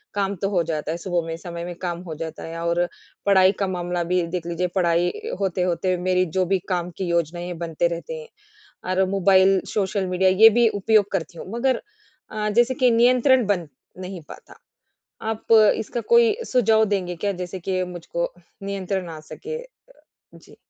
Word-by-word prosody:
काम 200 Hz, 0 st, 0 dB
तो 195 Hz, -, +2 dB
हो 180 Hz, -4 st, +1 dB
जाता 155 Hz, -1 st, -3 dB
है 170 Hz, -, -3 dB
सुबह 175 Hz, -1 st, -2 dB
में 165 Hz, -, -3 dB
समय 170 Hz, 0 st, -7 dB
में 175 Hz, -1 st, -6 dB
काम 175 Hz, -1 st, -3 dB
हो 160 Hz, -, -5 dB
जाता 160 Hz, -, -7 dB
है 165 Hz, 0 st, -6 dB
और 170 Hz, +1 st, +1 dB, 0.4 s
पढ़ाई 190 Hz, -1 st, +5 dB
का 195 Hz, -, +2 dB
मामला 175 Hz, -1 st, -2 dB
भी 180 Hz, -, +3 dB
देख 170 Hz, -1 st, -4 dB
लीजिए 170 Hz, +1 st, -1 dB
पढ़ाई 175 Hz, -1 st, +2 dB
अ, -, -, -6 dB
होते-होते 185 Hz, 0 st, 0 dB
मेरी 185 Hz, 0 st, +3 dB
जो 185 Hz, -, +3 dB
भी 190 Hz, -, +3 dB
काम 175 Hz, -1 st, -1 dB
की 190 Hz, -, -2 dB
योजनाएँ 170 Hz, +1 st, -1 dB
बनते 165 Hz, +1 st, 0 dB
रहते 170 Hz, -, -5 dB
हैं। 470 Hz, -, -12 dB, 0.7 s
और 190 Hz, -, +4 dB
मोबाइल, 195 Hz, 0 st, +4 dB
सोशल 195 Hz, -1 st, 0 dB
मीडिया 185 Hz, +1 st, +2 dB
ये 215 Hz, +4 st, +8 dB
भी 235 Hz, -, +6 dB
उपयोग 205 Hz, 0 st, +2 dB
करती 170 Hz, -3 st, -3 dB
हूँ। -, -, -8 dB
मगर 255 Hz, +1 st, 0 dB, 0.5 s
अ, 210 Hz, -1 st, -2 dB
जैसे 240 Hz, +4 st, +3 dB
कि 250 Hz, -1 st, +3 dB
नियंत्रण 250 Hz, +1 st, +4 dB
बन 180 Hz, -6 st, 0 dB, 0.3 s
नहीं 185 Hz, -1 st, -6 dB
पाता। -, -, -12 dB, 0.8 s
आप 225 Hz, +1 st, -3 dB, 0.2 s
इसका 235 Hz, +2 st, -4 dB
कोई 470 Hz, -2 st, +6 dB
सुझाव 220 Hz, -3 st, +3 dB
देंगे 185 Hz, -4 st, -2 dB
क्या 200 Hz, +4 st, -1 dB
जैसे 180 Hz, +1 st, -5 dB
कि 185 Hz, +1 st, -1 dB
मुझको 170 Hz, 0 st, -4 dB, 0.3 s
नियंत्रण 195 Hz, -2 st, -3 dB
आ 160 Hz, -, -7 dB
सके? 455 Hz, -, -7 dB
अ, -, -, -13 dB, 0.7 s
जी। -, -, -17 dB
185 Hz, 185 wpm, -23 LUFS, 175-205 Hz, 0.8 s, ये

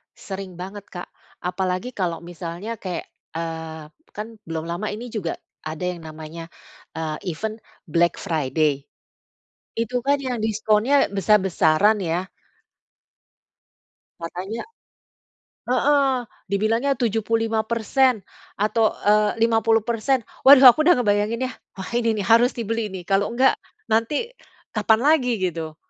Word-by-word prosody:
Sering 190 Hz, -2 st, -7 dB
banget, 195 Hz, +3 st, -8 dB
Kak. 175 Hz, -1 st, -8 dB, 0.4 s
Apalagi 185 Hz, +5 st, -2 dB
kalau 175 Hz, -7 st, -3 dB
misalnya 175 Hz, +6 st, -6 dB
kayak, 180 Hz, -3 st, -5 dB, 0.3 s
eee, 160 Hz, -2 st, -5 dB, 0.2 s
kan 210 Hz, +1 st, -4 dB, 0.2 s
belum 160 Hz, -1 st, -3 dB
lama 175 Hz, +5 st, -3 dB
ini 235 Hz, +3 st, -7 dB
juga 195 Hz, -7 st, -3 dB, 0.3 s
ada 155 Hz, +2 st, -5 dB
yang 180 Hz, -1 st, -2 dB
namanya, 160 Hz, +1 st, -8 dB, 0.5 s
eee, 155 Hz, -1 st, -3 dB, 0.2 s
event 220 Hz, +7 st, -5 dB, 0.3 s
Black 170 Hz, +2 st, +2 dB
Friday. 150 Hz, -4 st, 0 dB, 0.9 s
Itu 230 Hz, +2 st, -1 dB
kan 280 Hz, +1 st, +4 dB
yang 250 Hz, -3 st, -3 dB
diskonnya 220 Hz, +5 st, +2 dB
besar-besaran 195 Hz, 0 st, +3 dB
ya. 175 Hz, 0 st, -1 dB, 1.9 s
Katanya 185 Hz, -, -5 dB, 1.0 s
heeh, 270 Hz, +1 st, +2 dB, 0.3 s
dibilangnya 225 Hz, +7 st, +1 dB
75% 225 Hz, +2 st, +1 dB, 0.4 s
atau, 215 Hz, +2 st, +2 dB, 0.2 s
eee, 210 Hz, +1 st, +3 dB
50%. 225 Hz, +2 st, +1 dB, 0.2 s
Waduh 270 Hz, 0 st, +9 dB
aku 310 Hz, -, +1 dB
udah 345 Hz, -5 st, +5 dB
ngebayanginnya. 225 Hz, +3 st, 0 dB, 0.2 s
Wah 190 Hz, -, -6 dB
ini 230 Hz, -2 st, +1 dB
nih 200 Hz, -, -2 dB
harus 230 Hz, +2 st, +5 dB
dibeli 225 Hz, -3 st, -3 dB
nih. 180 Hz, -2 st, -8 dB
Kalau 195 Hz, +2 st, +1 dB
enggak 255 Hz, +3 st, +4 dB, 0.3 s
nanti 260 Hz, -, 0 dB, 0.4 s
kapan 220 Hz, +1 st, +3 dB
lagi 255 Hz, -7 st, +3 dB
gitu. 165 Hz, -4 st, -3 dB
210 Hz, 115 wpm, -23 LUFS, 175-230 Hz, 1.9 s, Waduh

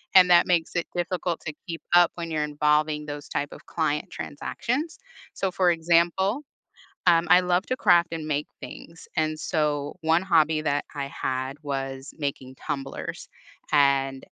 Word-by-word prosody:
and 185 Hz, -1 st, +8 dB
that 175 Hz, -, +7 dB
makes 170 Hz, -2 st, +1 dB
it 170 Hz, -, -1 dB
difficult 175 Hz, -1 st, -2 dB
to 155 Hz, -, -5 dB
keep 165 Hz, -2 st, -5 dB
up 175 Hz, -1 st, +6 dB
when 170 Hz, -1 st, -5 dB
you're 155 Hz, -1 st, 0 dB
involving 150 Hz, 0 st, +1 dB
those 145 Hz, -1 st, -7 dB
type 145 Hz, -, -2 dB
of -, -, -12 dB
client 155 Hz, -2 st, -1 dB
transactions, 265 Hz, -, -3 dB, 0.4 s
so 190 Hz, -, -1 dB
for 180 Hz, 0 st, +2 dB
example, 175 Hz, -, +2 dB, 0.6 s
um, 170 Hz, -1 st, +4 dB
I 180 Hz, +1 st, +7 dB
love 180 Hz, +1 st, +1 dB
to 255 Hz, -, 0 dB
craft 175 Hz, -6 st, +4 dB
and 160 Hz, -2 st, -4 dB
make 150 Hz, -1 st, -1 dB
things, 165 Hz, +5 st, -10 dB
and 155 Hz, -1 st, 0 dB
so 150 Hz, -2 st, -1 dB
1 160 Hz, +2 st, +3 dB
hobby 160 Hz, -4 st, +3 dB
that 145 Hz, -2 st, 0 dB
I 140 Hz, -1 st, -3 dB
had 130 Hz, 0 st, -3 dB
was 135 Hz, -1 st, -4 dB
making 135 Hz, -3 st, -4 dB
tumblers, 135 Hz, 0 st, -5 dB, 0.4 s
and 135 Hz, -2 st, +2 dB
155 Hz, 160 wpm, -25 LUFS, 145-175 Hz, 0.6 s, and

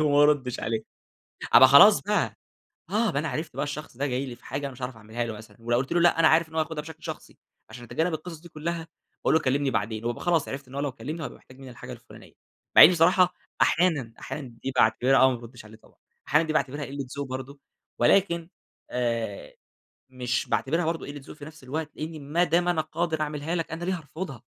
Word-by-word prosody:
وما 145 Hz, -1 st, +4 dB
ارُدِّش 140 Hz, -4 st, +2 dB
عليه، 110 Hz, 0 st, -2 dB, 0.7 s
أبقى -, -, +10 dB
خلاص -, -, +8 dB
بقى، -, -, -1 dB, 0.5 s
آه 220 Hz, +2 st, +2 dB
أبقى، 140 Hz, -, -1 dB
أنا 160 Hz, -, -3 dB
عرِفت 155 Hz, +4 st, -5 dB
بقى -, -, 0 dB
الشخص 145 Hz, -3 st, -7 dB
ده 140 Hz, +2 st, -1 dB
جاي 130 Hz, +1 st, -2 dB
لي 125 Hz, -, -7 dB
في 120 Hz, -, -25 dB
حاجة 135 Hz, +3 st, -4 dB
أنا 135 Hz, -, -6 dB
مش 125 Hz, -, -13 dB
هاعرَف 125 Hz, -2 st, -4 dB
أعمِلها 110 Hz, +2 st, -4 dB
له 115 Hz, -, -5 dB
مثلًا، 110 Hz, +3 st, -13 dB
ولو 120 Hz, +1 st, 0 dB
قُلت 130 Hz, +2 st, -2 dB
له 175 Hz, -, +3 dB
لأ، 170 Hz, -1 st, +4 dB
أنا 160 Hz, -, +7 dB
عارِف 160 Hz, +1 st, +3 dB
إن 160 Hz, -, -16 dB
هو 160 Hz, -, +1 dB
ياخُدها 155 Hz, -1 st, -3 dB
بشكل 160 Hz, +1 st, -12 dB
شخصي. -, -, -8 dB, 0.3 s
عشان 120 Hz, +2 st, -10 dB
أتجنَّب 160 Hz, +8 st, -1 dB
القصص 160 Hz, 0 st, -7 dB
دي 170 Hz, -, -13 dB
كلها 165 Hz, +1 st, -4 dB, 0.4 s
باقول -, -, +3 dB
له: 160 Hz, -, +4 dB
"كلِّمني 135 Hz, +1 st, +1 dB
بعدين." 110 Hz, 0 st, -2 dB
وابقى 120 Hz, 0 st, -3 dB
خلاص، 170 Hz, -4 st, +2 dB
عرِفت 135 Hz, 0 st, -6 dB
إن 130 Hz, -, -13 dB
هو 140 Hz, -, -2 dB
لو 145 Hz, -2 st, -2 dB
كلَّمني 155 Hz, +7 st, -6 dB
هيبقى -, -, -7 dB
محتاج 130 Hz, +1 st, -18 dB
مني 135 Hz, -1 st, -10 dB
الحاجة 120 Hz, -, -9 dB
الفلانية. -, -, -14 dB, 0.4 s
مع -, -, +12 dB
إني 175 Hz, -, +11 dB
بصراحة 180 Hz, +2 st, +4 dB, 0.3 s
أحيانًا 160 Hz, -9 st, +2 dB
أحيانًا 140 Hz, -4 st, -6 dB
دي 135 Hz, -, -2 dB
باعتبِرها 125 Hz, +4 st, +4 dB
آه، 130 Hz, -, +7 dB
ما 125 Hz, -, -2 dB
بارُدِّش 120 Hz, 0 st, -12 dB
عليه، 110 Hz, +1 st, -13 dB
طبعًا -, -, -24 dB, 0.3 s
أحيانًا 150 Hz, +3 st, +3 dB
دي 155 Hz, -, -1 dB
باعتبِرها 145 Hz, -1 st, -1 dB
قِلَّة 140 Hz, 0 st, -6 dB
ذوق 140 Hz, -, -2 dB
برضه، 130 Hz, +2 st, -7 dB, 0.4 s
ولكن 170 Hz, +5 st, +3 dB, 0.4 s
آآ، 115 Hz, -4 st, -3 dB, 0.6 s
مش 125 Hz, -1 st, -2 dB
باعتبِرها 165 Hz, +5 st, 0 dB
برضه 165 Hz, 0 st, -2 dB
قِلَّة 145 Hz, 0 st, -8 dB
ذوق -, -, -11 dB
في 145 Hz, -, -9 dB
نفس 155 Hz, -2 st, -13 dB
الوقت، 155 Hz, +4 st, -4 dB
لإني 155 Hz, 0 st, -6 dB
ما 150 Hz, +5 st, 0 dB
دام 175 Hz, 0 st, +2 dB
أنا 175 Hz, -3 st, +2 dB
قادِر 160 Hz, 0 st, -2 dB
أعمِلها 150 Hz, +2 st, -2 dB
لك، 165 Hz, -2 st, -3 dB
أنا 165 Hz, +1 st, -5 dB
ليه 185 Hz, 0 st, -1 dB
هارفُضها؟ 150 Hz, -4 st, -7 dB
145 Hz, 225 wpm, -26 LUFS, 125-160 Hz, 0.7 s, مع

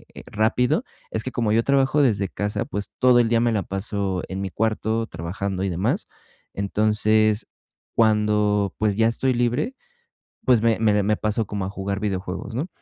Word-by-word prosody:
eh, -, -, -9 dB
rápido, 125 Hz, -, +1 dB, 0.3 s
es 110 Hz, -, -2 dB
que 130 Hz, -, -4 dB
como 115 Hz, -3 st, 0 dB
yo 115 Hz, +1 st, +3 dB
trabajo 140 Hz, +2 st, +3 dB
desde 105 Hz, -7 st, +2 dB
casa, 105 Hz, +3 st, -3 dB
pues 105 Hz, -6 st, -4 dB
todo 125 Hz, -1 st, +5 dB
el 115 Hz, -2 st, +3 dB
día 115 Hz, -1 st, +3 dB
me 120 Hz, 0 st, +2 dB
la 105 Hz, -, +1 dB
paso 95 Hz, 0 st, -3 dB
en 95 Hz, +1 st, -5 dB
mi 95 Hz, -, -3 dB
cuarto 110 Hz, +2 st, -1 dB
trabajando 95 Hz, +2 st, -4 dB
y 100 Hz, -, 0 dB
demás. 90 Hz, +1 st, -1 dB, 0.5 s
Entonces, 110 Hz, +1 st, +2 dB, 0.5 s
cuando 105 Hz, -3 st, +2 dB
pues, 105 Hz, -2 st, +1 dB
ya 110 Hz, +2 st, +3 dB
estoy 130 Hz, +3 st, +1 dB
libre, 120 Hz, -, 0 dB, 0.7 s
pues, 125 Hz, -4 st, +4 dB
me 115 Hz, -1 st, +3 dB
me 110 Hz, -2 st, +3 dB
de 105 Hz, -, +3 dB
me 105 Hz, +1 st, +1 dB
paso 110 Hz, 0 st, -1 dB
como 100 Hz, -2 st, -3 dB
a 95 Hz, -, -4 dB
jugar 100 Hz, 0 st, -3 dB
videojuegos, 100 Hz, +2 st, -4 dB
¿no? 135 Hz, +9 st, -2 dB
105 Hz, 185 wpm, -23 LUFS, 100-115 Hz, 0.7 s, todo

